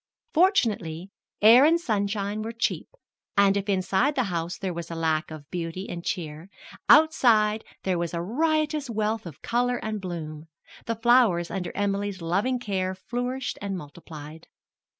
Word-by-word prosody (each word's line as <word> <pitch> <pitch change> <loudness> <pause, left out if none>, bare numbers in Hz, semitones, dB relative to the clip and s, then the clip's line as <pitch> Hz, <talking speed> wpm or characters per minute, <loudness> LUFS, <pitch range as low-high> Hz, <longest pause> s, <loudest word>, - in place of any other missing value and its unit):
Fortunately, 215 - +1 0.3
air 235 +5 +9
and 330 +3 +5
sunshine 205 -5 -1
were 225 +2 -5
cheap, 230 - -1 0.5
and, 200 0 +5
if 200 0 -2
inside 195 +8 +1
the 255 - +2
house 170 +1 -3
there 190 -2 -3
was 170 -1 -6
lack 160 -1 -1
of 155 -2 -10
beauty 175 +2 -4
and 170 -1 -6
cheer, 160 0 -4 0.4
outside 220 -9 +5 0.2
there 185 -2 0
was 170 -1 -2
a 170 - -3
riotous 300 - 0
wealth 220 -2 -1
of 155 - -12
color 245 +1 +1
and 215 -2 -4
bloom 160 -4 -6 0.4
the 230 - 0
flowers 225 -7 +3
under 180 -3 -3
Emily's 200 -1 -1
loving 195 +10 0
care 190 -5 -2
flourished 245 +5 -4
and 200 -2 -3
multiplied. 155 0 -10
200 Hz, 150 wpm, -26 LUFS, 170-235 Hz, 0.5 s, air